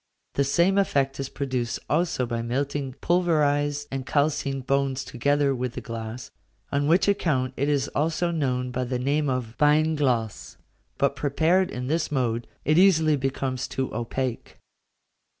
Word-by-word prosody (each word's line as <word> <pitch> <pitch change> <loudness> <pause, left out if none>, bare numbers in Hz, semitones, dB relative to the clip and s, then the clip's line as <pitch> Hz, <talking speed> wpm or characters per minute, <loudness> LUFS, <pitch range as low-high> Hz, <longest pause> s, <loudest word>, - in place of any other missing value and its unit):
The 140 - +2
same 170 +8 +3
effect 135 -8 +1
is 135 -1 -3
produced 130 -5 -2
also 160 -4 +1
by 115 -1 -3
melting 135 +2 -2
pulverised 145 -4 +1
and 135 -1 -3
calcined 140 -1 0
bones 135 -1 0
together 140 +3 +1
with 125 -1 -3
the - - -5
glass, 115 +1 -7 0.4
on 145 +1 +1
which 170 +6 +4
account 145 -10 +1
it 140 +2 0
is 145 -2 +1
also 165 +3 0
known 125 -6 -1
by 125 +1 -2
the 125 0 -2
name 140 +3 0
of 125 -3 -3
beinglas; 150 -7 +1 0.4
but, - - +1
prepared 165 +6 +2
in 125 0 -5
this 155 +4 -1
mode, 120 -4 -1 0.2
it 155 +3 +4
easily 160 -5 +5
becomes 135 -1 -2
too 130 -1 -3
opaque. 120 +1 -3
140 Hz, 150 wpm, -25 LUFS, 125-150 Hz, 0.4 s, easily